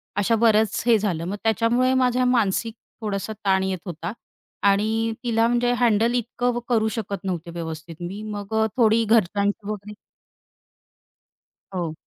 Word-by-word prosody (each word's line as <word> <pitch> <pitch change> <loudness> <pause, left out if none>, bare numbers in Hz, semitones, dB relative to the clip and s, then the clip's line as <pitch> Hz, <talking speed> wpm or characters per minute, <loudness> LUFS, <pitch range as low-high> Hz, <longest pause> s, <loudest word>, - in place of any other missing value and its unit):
अशा 205 +3 +2
बरंच 220 -2 +3
हे 235 -2 +5
झालं. 175 -6 -1
मग 190 +3 -3
त्याच्यामुळे 235 +4 +2
माझ्या 255 -1 +2
मानसिक 230 -2 +1 0.3
थोडासा 210 0 -3
ताण 190 -1 +3
येत 190 -1 -1
होता 170 -1 -5 0.6
आणि 220 +3 +1
तिला 230 -1 +2
म्हणजे 240 0 +2
हँडल 230 0 +3
इतकं 245 +1 -1
करू 220 -2 +2
शकत 200 -4 -4
नव्हते 175 -3 -4
व्यवस्थित 165 -1 -6
मी. 190 +4 -5
मग 205 0 -6
अ, - - +3
थोडी 230 -1 +4
घरच्यांची 205 -1 +1
वगैरे 210 0 -6 1.8
हो. 170 -3 -2
215 Hz, 140 wpm, -23 LUFS, 195-230 Hz, 1.8 s, हे